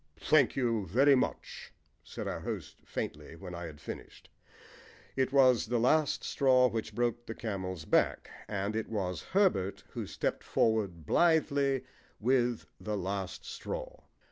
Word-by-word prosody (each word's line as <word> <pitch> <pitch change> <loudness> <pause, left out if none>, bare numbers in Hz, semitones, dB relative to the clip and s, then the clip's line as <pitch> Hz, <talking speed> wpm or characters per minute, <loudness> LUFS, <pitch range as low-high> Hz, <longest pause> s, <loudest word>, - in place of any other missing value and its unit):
"Thank 145 -5 +4
you 115 -6 0
very 135 - +5
much," 130 - -2 0.3
said - - -6
our - - -3
host - - -5
faintly 75 +2 -5
when 90 +1 -9
I 85 0 -5
had 75 -2 -11
finished. - - -9 0.8
It 130 -1 +1
was 130 -4 +5
the 120 +1 +1
last 150 +6 +2
straw 130 -2 +4
which 110 -2 -4
broke 120 0 -1
the 110 - -5
camel's 95 -7 -4
back, - - +2 0.2
and 100 +1 -2
it 110 - -2
was 95 -5 -2
Herbert 185 - +1
who - - -5
stepped - - -2
forward 100 -8 0
blithely 140 - +3 0.4
with 120 0 +1
the 105 -1 -3
last 95 0 -4
straw. - - -6
115 Hz, 145 wpm, -31 LUFS, 95-135 Hz, 0.8 s, very